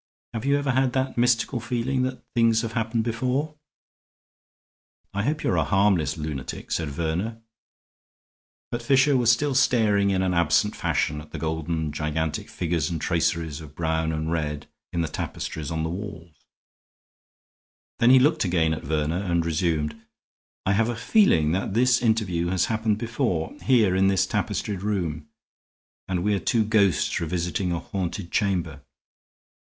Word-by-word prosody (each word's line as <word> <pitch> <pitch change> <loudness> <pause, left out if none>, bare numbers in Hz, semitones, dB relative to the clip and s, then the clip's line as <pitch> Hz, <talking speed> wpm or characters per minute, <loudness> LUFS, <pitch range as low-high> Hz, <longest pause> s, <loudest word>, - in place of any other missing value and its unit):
Have 115 +1 -4
you 140 +1 +3
ever 145 -1 0
had 130 0 +1
that 130 0 -1
mystical 120 +1 +2
feeling 125 +2 -1
that 130 0 -3
things 115 -1 +3
have 115 0 -4
happened 115 -1 0
before?" 125 +6 -1 1.6
"I 100 - -1
hope 150 +7 -1
you - - +1
are 90 - +1
a 80 - +3
harmless 90 -4 +2
lunatic," 75 -4 -5
said 80 -3 -1
Verner. 85 +10 -2 1.3
But 120 - -3
Fisher 135 +3 +4
was 120 -2 +4
still 140 +4 +1
staring 110 -6 +3
in 95 -1 +1
an 90 -1 +1
absent 85 +5 +2
fashion 75 0 -1
at 75 - -14
the - - -7
golden 80 0 -2
gigantic 75 +1 -2
figures 85 -3 -1
and 85 -2 -3
traceries 80 -2 -1
of 75 -2 -12
brown 80 -1 0
and 80 +1 -2
red 75 -3 -2 0.3
in 85 - -1
the 80 - -1
tapestries 80 -1 -5
on 80 -1 -2
the 80 - -1
walls; 90 -4 -7 1.7
then 115 - +5
he 130 - +8
looked 150 +5 +3
again 85 -4 +1
at 80 - -4
Verner 80 +4 -1
and 85 -4 0
resumed: 80 +2 -1 0.6
"I 95 - +2
have 110 +3 +2
a 120 - -2
feeling 115 - +3
that 95 +3 -2
this 125 +1 +4
interview 105 -7 +1
has 90 0 +1
happened 110 -1 0
before, 115 - -2
here 110 -8 +4
in 95 +1 +3
this 95 -2 +3
tapestried 100 -3 -2
room, 85 -7 -2 0.8
and 90 -2 -1
we 105 +1 +2
are 100 - +1
two 110 +1 +1
ghosts 100 -6 +2
revisiting 90 +2 -1
a 85 - 0
haunted 90 0 -4
chamber. 85 -8 -1
95 Hz, 160 wpm, -25 LUFS, 80-115 Hz, 1.7 s, he